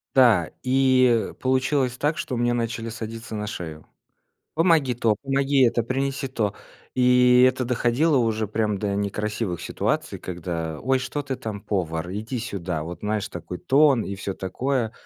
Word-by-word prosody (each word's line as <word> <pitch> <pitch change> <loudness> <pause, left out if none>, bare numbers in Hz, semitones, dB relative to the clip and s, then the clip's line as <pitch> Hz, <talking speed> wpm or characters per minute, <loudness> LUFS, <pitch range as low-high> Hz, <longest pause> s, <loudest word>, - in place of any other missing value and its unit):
Да, 115 -11 +5
и, 130 -3 +3
э, - - -11
получилось 130 0 0
так, 150 +4 0
что 125 - -3
мне 120 0 +1
начали 115 -1 -2
садиться 115 0 -7
на 105 0 -3
шею. 80 -7 -7 0.7
"Помоги 160 -6 +3
то, 115 -2 +1
помоги 135 0 +2
это, 120 0 +2
принеси 135 +3 -2
то." 105 -6 -1 0.4
И 125 0 +5
это 130 0 -1
доходило 125 +5 +2
уже 110 -2 0
прям 105 -1 -1
до 100 -1 -1
некрасивых 100 -3 -2
ситуаций, - - -2
когда: 85 -3 -4
"Ой, 130 +1 +2
что 140 +3 -3
ты 135 -2 -4
там, 105 -3 -6
повар, 85 -3 -2
иди 110 +5 -4
сюда". 90 -8 -4
Вот, 85 +3 -7
знаешь, 105 -1 -2
такой 90 +1 -7
тон 140 -3 +4
и 100 - -4
всё 95 0 -4
такое. 120 +4 -2
115 Hz, 160 wpm, -24 LUFS, 100-130 Hz, 0.7 s, Да